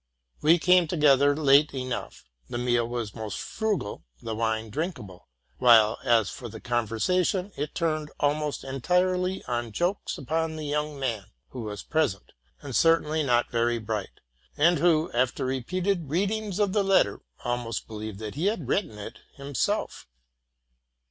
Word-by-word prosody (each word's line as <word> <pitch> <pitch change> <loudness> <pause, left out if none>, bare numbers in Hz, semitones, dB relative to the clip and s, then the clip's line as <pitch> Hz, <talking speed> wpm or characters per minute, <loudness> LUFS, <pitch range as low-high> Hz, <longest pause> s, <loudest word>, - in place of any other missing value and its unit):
We 165 +3 +6
came 180 0 +4
together 145 -3 +4
late 145 -1 +4
enough, 130 -2 -5 0.3
the - - -3
meal 120 -1 +1
was 120 -3 -4
most 110 -3 -5
frugal, 210 - -2 0.2
the 115 - -5
wine 110 0 -1
drinkable; 125 - -5 0.3
while, 115 -3 +6
as 115 -6 +3
for 120 - -8
the 110 +1 -9
conversation, 125 - 0
it 145 +1 -4
turned 155 -2 -1
almost 150 0 0
entirely 180 +7 0
on 120 -2 -2
jokes 175 - -1
upon 160 +3 -2
the 155 -1 -5
young 150 0 -2
man, 115 -7 -2 0.2
who 125 - -7
was 105 -3 -6
pres 155 -10 +1
ent, 100 - -25 0.3
and 135 -4 -5
certainly 160 -1 +3
not 120 -4 +1
very 120 0 +1
bright, 110 -3 -4 0.4
and 170 +4 +4
who, 165 -2 +3
after 125 +1 0
repeated 170 +6 -1
readings 200 +4 -1
of 205 -3 +1
the 205 - +2
letter, 190 - +2 0.2
almost 120 -2 -2
believed 110 -2 -7
that 110 0 -6
he 160 +8 -1
had 190 - -1
written 135 - -1
it 105 - -8 0.2
himself. 140 -1 -2
140 Hz, 150 wpm, -27 LUFS, 115-165 Hz, 0.4 s, We